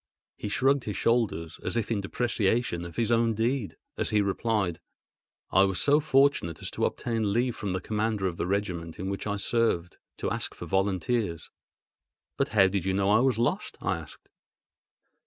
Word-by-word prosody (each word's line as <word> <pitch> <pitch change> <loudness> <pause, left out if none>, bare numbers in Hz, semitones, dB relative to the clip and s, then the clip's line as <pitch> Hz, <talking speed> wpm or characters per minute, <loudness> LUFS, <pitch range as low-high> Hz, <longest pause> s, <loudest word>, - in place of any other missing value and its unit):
He 105 - -5
shrugged 135 +4 +2
his 105 - -3
shoulders, 110 -9 0
as - - -2
if 115 0 -1
in 105 -3 0
depreciation 105 -3 0
of 85 - -9
his 115 0 0
own 115 -1 +3
deed, 115 0 -1 0.2
as - - +1
he 105 - +2
replied: 100 -3 0 0.7
"I 95 - +5
was 95 -1 -1
so 145 +1 +5
fortunate 135 - +2
as - - -3
to - - 0
obtain 115 -4 -1
leave 120 +1 +1
from 100 -3 -3
the 95 - -2
commander 110 -1 -1
of 90 -3 -2
the - - -2
regiment 90 -4 -2
in 95 +2 -3
which 100 - -4
I 105 - 0
served, 100 -5 0 0.2
to - - -2
ask - - -3
for - - -7
volunteers." 95 -2 -1 0.8
"But - - 0
how 105 -3 +5
did 95 -2 -1
you 95 0 0
know 100 +1 +2
I 110 - +5
was 130 -2 +2
lost?" 120 +1 -1
I - - -1
asked. - - -12
105 Hz, 185 wpm, -28 LUFS, 95-115 Hz, 0.8 s, I